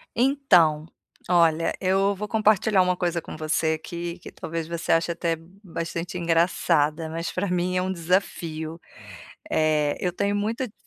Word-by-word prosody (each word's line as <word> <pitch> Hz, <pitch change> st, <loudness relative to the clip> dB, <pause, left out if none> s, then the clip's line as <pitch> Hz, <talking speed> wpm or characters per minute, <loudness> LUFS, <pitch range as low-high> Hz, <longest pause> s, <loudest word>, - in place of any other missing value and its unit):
Então, 195 Hz, -, +3 dB, 0.4 s
olha, 165 Hz, -2 st, +3 dB
eu 195 Hz, +2 st, +2 dB
vou 210 Hz, +2 st, -5 dB
compartilhar 215 Hz, -2 st, +3 dB
uma 180 Hz, 0 st, +1 dB
coisa 175 Hz, -2 st, -1 dB
com -, -, -9 dB
você 160 Hz, +1 st, 0 dB
aqui 170 Hz, 0 st, -5 dB
que -, -, -11 dB
talvez 165 Hz, 0 st, -5 dB
você 170 Hz, 0 st, -3 dB
ache 165 Hz, +1 st, +3 dB
até 170 Hz, -1 st, -1 dB, 0.3 s
bastante 170 Hz, 0 st, -4 dB
engraçada, 165 Hz, -2 st, +1 dB
mas 165 Hz, +1 st, -4 dB
pra 185 Hz, +2 st, -2 dB
mim 180 Hz, 0 st, 0 dB
é -, -, +2 dB
um 185 Hz, +1 st, -1 dB
desafio. 165 Hz, -2 st, -2 dB, 0.7 s
Eh, 155 Hz, -2 st, +2 dB
eu 180 Hz, -, 0 dB
tenho 200 Hz, +3 st, 0 dB
muita 225 Hz, +5 st, -1 dB
di 210 Hz, -, -18 dB
170 Hz, 155 wpm, -25 LUFS, 165-190 Hz, 0.7 s, Então